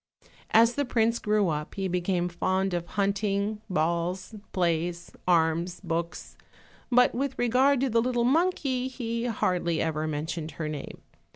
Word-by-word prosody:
As 230 +2 +5
the 285 - 0
prince 230 -2 +1
grew 210 -3 +2
up 150 -1 -3
he 195 -1 -1
became 180 0 0
fond 185 +2 0
of 175 -1 -2
hunting, 200 +1 0
balls, 170 +4 -1 0.2
plays, 170 -1 -1 0.2
arms, 170 0 +2
books; 170 +1 -4 0.6
but 250 0 +5
with 270 +1 -2
regard 255 +3 +3
to 270 - +1
the 230 +1 +3
little 240 0 0
monkey, 270 -3 +1
he 235 -2 -3
hardly 180 -7 0
ever 155 -1 -1
mentioned 155 +1 -4
her 155 +2 -4
name. 150 -2 -7
190 Hz, 145 wpm, -27 LUFS, 170-235 Hz, 0.6 s, As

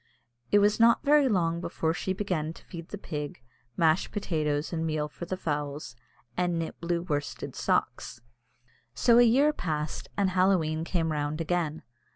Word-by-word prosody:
It 205 - +6
was 205 +2 +3
not 230 0 +5
very 290 -2 +5
long 170 -5 +1
before 165 -2 -1
she 185 - -3
began 180 -5 -2
to - - -17
feed 170 -3 -9
the 205 - -6
pig, 150 -6 -5 0.4
mash 160 +1 +3
potatoes 155 -6 -1
and 165 -1 -1
meal 155 -2 -1
for 150 +3 -8
the 185 - -3
fowls, 145 -6 -3 0.4
and 175 +1 0
knit 165 -1 -5
blue 170 0 -1
worsted 145 -5 -3
socks. - - -1 0.8
So 235 - +5
a - - +8
year 265 +6 +5
passed, 155 - -3
and 195 -2 +2
Halloween 180 -4 +2
came 165 -3 0
round 150 +1 -2
again. 165 -2 -1
170 Hz, 165 wpm, -28 LUFS, 155-190 Hz, 0.8 s, a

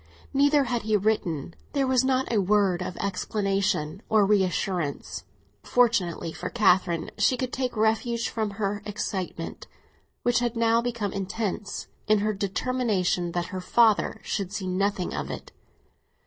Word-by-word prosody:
Neither 285 +1 +4
had 240 -2 -1
he 215 0 +2
written; 180 -7 -1 0.2
there 280 -2 +2
was 260 -1 +3
not 260 -1 +1
a 210 - +3
word 195 -2 +2
of 180 0 -4
explanation 195 -4 -1
or 215 -2 +5
reassurance. 185 -5 0 0.4
Fortunately 185 -9 +1
for - - -5
Catherine 185 -6 +2
she 255 - +3
could 255 0 -3
take 250 -3 -2
refuge 225 +2 +1
from 220 -2 -2
her 205 -1 -1
excitement, 190 -5 -4 0.6
which 245 0 +3
had 240 -1 -1
now 230 0 +3
become 235 -4 -2
intense, 200 +1 -3 0.2
in 215 0 +5
her 210 +1 0
determination 195 -3 0
that 175 0 -3
her 185 - -3
father 225 +2 +3
should 195 -3 -2
see 205 -2 -4
nothing 190 0 0
of - - -3
it. - - -7
205 Hz, 145 wpm, -26 LUFS, 185-235 Hz, 0.6 s, or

